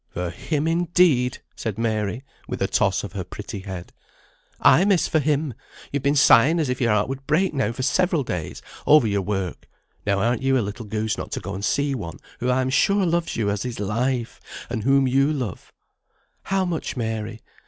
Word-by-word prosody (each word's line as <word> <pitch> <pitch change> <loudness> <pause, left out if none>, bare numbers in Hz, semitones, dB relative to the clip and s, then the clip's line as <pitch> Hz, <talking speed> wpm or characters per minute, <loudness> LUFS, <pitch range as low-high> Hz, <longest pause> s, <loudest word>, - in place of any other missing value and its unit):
"For 90 -1 -4
him, 150 - -2
indeed!" 165 -6 +2
said 110 -3 -4
Mary, 110 +1 -1 0.2
with - - -4
a - - +1
toss - - +1
of - - -7
her - - -3
pretty - - -7
head. 95 -2 -8 0.7
"Ay, 180 - +6
miss, 195 -3 +3
for 160 - +2
him! 145 -1 0 0.4
You've 140 - -1
been 140 +2 +2
sighing 145 +3 +6
as 150 -5 0
if 125 0 -2
your 115 -2 +3
heart 105 0 +2
would 135 +1 -6
break 170 +5 +2
now 135 -4 0
for 130 +2 -5
several 175 +1 +2
days, 90 -9 -5 0.2
over 150 -4 +7
your 100 -2 +1
work; 95 -2 -4 0.3
now 100 -1 +1
arn't 115 +4 +1
you 135 0 +2
a - - +2
little 105 +3 -6
goose 110 +1 -2
not - - -6
to - - -2
go 100 - -6
and 100 +1 -5
see 140 +5 +1
one 90 -10 -5 0.2
who 125 - -1
I 130 +1 +2
am 130 0 -1
sure 200 +7 +3
loves 170 0 0
you 105 -3 0
as 100 - -2
his 125 -4 -4
life, 115 +4 -1 0.3
and 115 -3 -2
whom 135 +3 +3
you 135 +3 +3
love; 125 -10 -4 0.7
'How 195 -1 +1
much, 165 -6 -3
Mary?' 110 -2 -3
125 Hz, 205 wpm, -23 LUFS, 105-150 Hz, 0.7 s, over